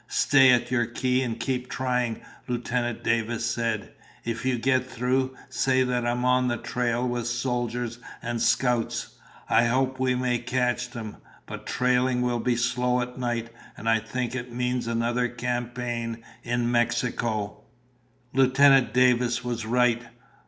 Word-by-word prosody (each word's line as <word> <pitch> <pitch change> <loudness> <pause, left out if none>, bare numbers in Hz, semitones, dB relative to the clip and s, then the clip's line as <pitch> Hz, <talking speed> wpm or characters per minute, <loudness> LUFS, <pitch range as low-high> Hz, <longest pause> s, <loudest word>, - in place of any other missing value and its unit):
"Stay 135 -2 +5
at 125 -1 +3
your 120 -2 +2
key 125 +2 0
and 115 -3 -3
keep 125 +1 -2
trying," 125 -3 -1 0.3
Lieutenant 120 -1 -2
Davis 115 0 0
said. 115 -3 -2 0.3
"If 115 +1 -3
you 130 -1 +1
get 130 +1 +1
through, 130 +2 0
say 130 0 +2
that 125 -1 0
I'm 120 +1 0
on 125 0 +3
the 120 -1 0
trail 120 +1 -1
with 120 -1 -2
soldiers 120 -1 -2 0.2
and 120 -1 -3
scouts. 120 0 +1 0.4
I 115 - +4
hope 130 +2 +1
we 130 -1 +2
may 125 -1 0
catch 125 0 -1
them, 115 -4 -7 0.3
but - - -8
trailing 125 0 +2
will 120 -1 0
be 120 +1 +1
slow 125 +1 +1
at 125 +1 -4
night, 120 -2 -2 0.3
and 115 - -7
I 115 0 +4
think 120 +2 -3
it 125 -1 -5
means 125 0 -1
another 120 +1 0
campaign 120 -1 -3 0.2
in 120 0 -1
Mexico." 120 -3 0 0.7
Lieutenant 135 0 +5
Davis 125 -1 +3
was 120 -2 -3
right. 120 0 +3
120 Hz, 145 wpm, -26 LUFS, 120-125 Hz, 0.7 s, Stay